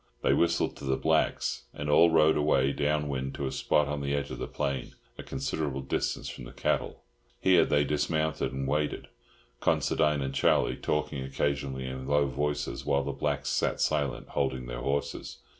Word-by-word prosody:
They - - +4
whistled 85 0 +2
to - - -11
the 65 -1 0
blacks, - - +1
and 75 - -4
all 85 +3 +6
rode 80 -1 +5
away 70 -3 +3
down 75 +1 0
wind 65 -1 -3
to 70 - -3
a 65 - -2
spot 75 -1 +2
on 75 0 -3
the 70 0 -1
edge 70 0 -3
of - - -6
the - - -3
plain, 70 -2 -3 0.2
a - - -7
considerable 70 +1 -3
distance 65 - -2
from 60 - -7
the - - -10
cattle. - - -1 0.4
Here 95 -2 +5
they 75 0 +3
dismounted 75 0 0
and 65 0 -3
waited, 75 +1 -1 0.5
Considine 75 -2 +2
and 65 0 -3
Charlie 70 - +3
talking 75 -2 -2
occasionally 70 -1 -2
in 65 0 -5
low 70 -1 +2
tones, 75 +2 -2
while 70 -1 +1
the 70 - -2
blacks 70 0 -2
sat - - 0
silent, 75 -3 0
holding 65 -1 -1
their - - -5
horses. 70 +1 -2
70 Hz, 180 wpm, -29 LUFS, 65-75 Hz, 0.5 s, all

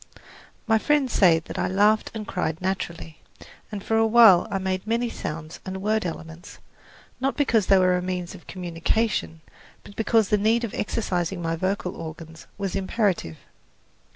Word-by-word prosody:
My 220 -1 +3
friends 290 -1 +1
say 175 -5 +5
that 160 - -7
I - - +1
laughed 210 +3 +3
and 215 -1 -5
cried 165 -3 -2
naturally, 175 -4 -4 0.5
and 205 -2 -6
for 225 - 0
awhile 225 -4 +6
I 195 - -1
made 190 +1 -3
many 235 +1 0
sounds 155 +1 -6
and 190 0 -5
word 215 0 0
elements, 165 +1 -9 0.6
not 270 +2 -1
because 230 -8 +2
they 195 - +6
were 185 -1 +3
a 180 - -1
means 180 -1 -4
of 185 - -14
communication, 175 0 -2 0.4
but 200 - -14
because 225 -2 +2
the 210 - +3
need 225 +3 +2
of 230 - -4
exercising 185 -5 -2
my 165 -1 -2
vocal 185 +1 -2
organs 160 0 -9
was 200 -2 -3
imperative. 190 - -1
190 Hz, 160 wpm, -24 LUFS, 170-220 Hz, 0.6 s, awhile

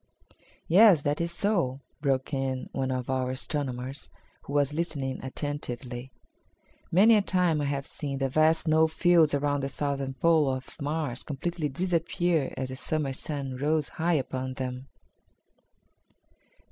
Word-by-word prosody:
"Yes, 185 -3 +7
that 145 +3 0
is 170 0 -1
so," 170 -9 0 0.2
broke 135 -1 0
in 135 -1 -2
one 135 -1 -2
of 130 -1 -2
our 130 -1 0
astronomers, 130 0 -3 0.4
who 140 - -7
was 145 0 +2
listening 150 -5 -3
attentively. 130 -2 -5 0.8
"Many 210 +6 +6
a - - +4
time 180 -5 +2
I - - -1
have 140 -1 -2
seen 140 -2 -4
the 135 0 0
vast 155 +4 +3
snow 160 0 +4
fields 160 -2 +4
around 145 0 0
the 135 - -2
southern 140 -2 -2
pole 155 0 +3
of 130 +4 -9
Mars 145 -4 -2
completely 155 +2 -3
disappear 170 -1 0
as 130 -1 -3
the 130 - -6
Summer 145 -1 -1
sun 135 -1 -4
rose 150 +2 0
high 170 +2 0
upon 130 -2 -2
them." 130 0 -5
145 Hz, 145 wpm, -28 LUFS, 130-160 Hz, 0.8 s, Yes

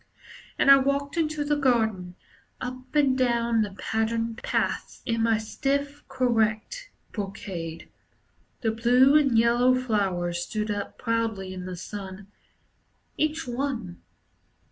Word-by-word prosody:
And 275 - +6
I 275 - +10
walked 280 +1 0
into 310 -2 0
the 295 0 +2
garden, 220 -10 +1 0.4
Up 255 +1 -7
and 280 -3 +4
down 235 -3 +2
the 205 -2 -3
patterned 225 +1 -1
paths, - - -2
In 230 -1 0
my 225 -1 +3
stiff, 280 +6 -2
correct 250 - 0 0.2
brocade. 190 -5 -6 0.7
The 225 - +1
blue 245 +5 +4
and 275 -6 +4
yellow 240 +2 +4
flowers 195 -8 0
stood 210 +4 -2
up 205 -1 -4
proudly 225 -5 -2
in 185 -1 -7
the 180 -1 -6
sun, 195 +1 -8 0.8
Each 310 0 -1
one. 245 - -3
230 Hz, 120 wpm, -26 LUFS, 205-265 Hz, 0.8 s, I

